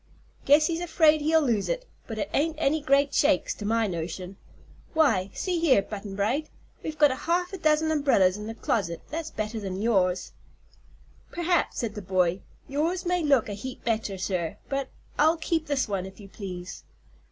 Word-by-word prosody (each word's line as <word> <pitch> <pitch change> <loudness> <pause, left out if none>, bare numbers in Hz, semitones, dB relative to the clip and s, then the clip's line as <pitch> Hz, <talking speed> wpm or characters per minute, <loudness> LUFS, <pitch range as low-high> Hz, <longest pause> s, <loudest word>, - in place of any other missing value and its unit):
Guess 295 +2 +6
he's 335 +1 -1
afraid 320 -3 +4
he'll 315 +1 +3
lose 230 -7 0
it, - - -2 0.2
but 225 - -5
it 205 -2 -1
ain't 310 +2 +1
any 310 0 +1
great 280 0 +3
shakes, 290 0 +2
to 210 - -8
my 225 +1 +2
notion. 180 +1 -4 0.6
Why, 225 -12 +3
see 360 -3 -1
here, 270 -12 +4
Butt'n 200 -1 -7
Bright, 240 +10 0 0.3
we've 310 0 -5
got 295 -2 +6
half 355 +6 -1
a 385 - -5
dozen 315 0 +2
umbrels 270 -12 +3
in 210 +1 -6
the 225 - -5
closet 180 -7 -1
that's 320 +1 -3
better 215 +1 -4
ner 190 -2 -4
yours." 190 -5 +1 1.0
"Perhaps," 345 0 0
said 230 -3 -2
the 210 - -6
boy. 185 -1 +1 0.3
"Yours 330 +7 -1
may 360 0 +1
look 280 -7 +3
a 205 - -4
heap 250 +6 -7
better, 220 -4 -1
sir, 180 -3 -2
but 275 -1 -2 0.3
I'll 315 +3 +5
keep 325 -1 -1
this 285 -2 0
one, 195 -2 -2
if 190 - -13
you 200 - -11
please." 180 -3 -7
260 Hz, 180 wpm, -27 LUFS, 200-315 Hz, 1.0 s, Guess